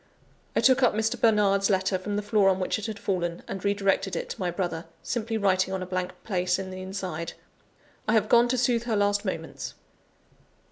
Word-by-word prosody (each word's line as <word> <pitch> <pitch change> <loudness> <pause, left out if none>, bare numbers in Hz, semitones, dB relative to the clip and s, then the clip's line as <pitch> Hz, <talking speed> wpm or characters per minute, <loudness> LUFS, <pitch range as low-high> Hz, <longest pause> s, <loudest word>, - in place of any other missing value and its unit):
I - - +3
took 265 0 +5
up 245 -4 +4
Mr. 220 +2 0
Bernard's 205 -3 +4
letter 190 -1 +1
from 205 +2 -3
the 205 - -1
floor 205 -2 +3
on 190 -1 +1
which 185 +3 -1
it 215 - -4
had 215 -2 -5
fallen, 175 -4 -2
and 195 -2 -5
re 200 0 +2
directed 195 -1 +1
it - - -4
to - - -7
my 180 -2 0
brother; 175 -2 -3 0.2
simply 225 -2 -2
writing 190 -2 +2
on 185 - -3
a - - -5
blank 185 0 -3
place 180 -3 0
in 190 -1 -5
the 185 0 -7
inside, 185 -4 -4 0.7
"I - - +2
have 215 -1 +3
gone 235 +2 +5
to 255 +1 0
soothe 240 -1 +1
her 230 -2 0
last 205 0 +1
moments." 165 -4 -5
195 Hz, 215 wpm, -27 LUFS, 185-215 Hz, 0.7 s, took